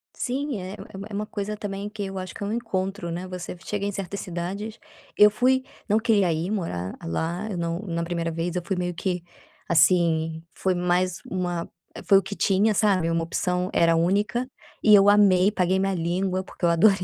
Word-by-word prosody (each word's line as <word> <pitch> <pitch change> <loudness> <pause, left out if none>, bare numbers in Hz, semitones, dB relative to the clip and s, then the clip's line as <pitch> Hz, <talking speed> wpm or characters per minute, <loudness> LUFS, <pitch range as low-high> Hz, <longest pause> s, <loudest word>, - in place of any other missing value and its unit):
Sim 270 -1 -2
é, 185 +2 -6
é - - -6
uma - - -10
uma 200 - -7
é - - -9
uma 210 +1 -2
coisa 210 0 -4
também 205 -1 -5
que 210 -1 -5
eu 195 0 -6
acho 185 -1 -5
que - - -7
é 200 - -2
encontro, 195 -6 -2
né, 180 +2 -4
você 180 -1 -6
chega 205 -1 -2
em 205 - -1
certas 200 0 -5
cidades 190 +6 -5 0.4
eu 210 - +8
fui 260 +4 +2 0.2
não 210 +1 +3
queria 210 -6 +3
ir 165 +5 -2
morar 95 - -3
lá 170 - -2
eu 190 - -3
não 170 0 -2
na 170 -5 -3
primeira 170 -1 -2
vez 165 +2 -3
eu 180 - 0
fui 195 - -1
meio 180 0 -2
que, 180 0 -2 0.4
assim 160 -1 +3
foi 190 -1 0
mais 180 0 0
uma 175 -2 -2 0.4
foi 195 - +6
o - - -4
que 200 +2 -6
tinha, 205 +3 +3
sabe? 190 -5 +2
Uma 165 0 0
opção, 180 +2 -1
era 165 0 +4
a - - +2
única, 205 +9 +1 0.3
e 215 - +6
eu 200 0 +8
amei 200 -2 +5
paguei 190 -2 +1
minha 195 0 0
língua, 185 +2 -1
porque 190 - -16
eu 170 - +5
adorei. 190 +4 +5
185 Hz, 210 wpm, -25 LUFS, 170-205 Hz, 0.4 s, eu